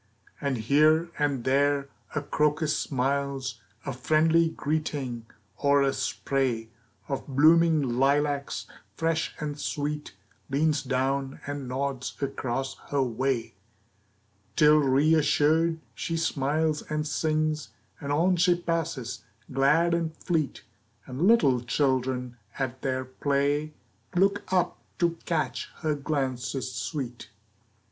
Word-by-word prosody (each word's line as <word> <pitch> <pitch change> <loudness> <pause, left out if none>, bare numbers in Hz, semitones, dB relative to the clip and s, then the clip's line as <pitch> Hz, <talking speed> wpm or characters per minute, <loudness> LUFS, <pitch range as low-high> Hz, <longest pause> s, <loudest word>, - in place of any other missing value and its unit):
And 140 -3 0
here 155 +8 +3
and 140 -4 0
there 140 +1 +2 0.3
a 150 - -1
crocus 150 +1 +1
smiles 135 -2 -1 0.2
A 135 - -3
friendly 160 +5 +3
greeting, 140 -7 -3 0.3
or 140 -1 +3
a 135 0 +2
spray 125 -5 -1 0.4
Of 135 -1 -4
blooming 160 +3 +5 0.2
lilacs, 140 +1 +1 0.3
fresh 165 0 -1
and 150 -1 -4
sweet, 150 -6 -3 0.3
Leans 145 +2 +2
down 135 +1 -1
and 145 -2 -4
nods 130 0 -3
across 135 -1 -3
her 140 -1 +2
way. 125 0 -1 1.0
Till, 150 -1 +6
reassured, 155 +3 +3
she 165 - -3
smiles 155 0 0
and 150 0 -1
sings, 155 0 0 0.3
And 140 - -4
on 175 +5 +3
she 175 +1 +4
passes, 165 -8 -3 0.3
glad 150 +6 +3
and 165 -2 -1
fleet, 160 -5 -1 0.4
And 130 +8 0
little 140 - +5
children 125 0 0 0.2
at 130 -1 -3
their 130 -1 -1
play 145 +3 0 0.4
Look 195 +2 +2
up 185 -2 +1 0.2
to 170 -1 +1
catch 130 -9 -1
her 155 -2 +1
glances 135 -3 -2
sweet. 125 0 -5
145 Hz, 110 wpm, -27 LUFS, 130-155 Hz, 1.0 s, Till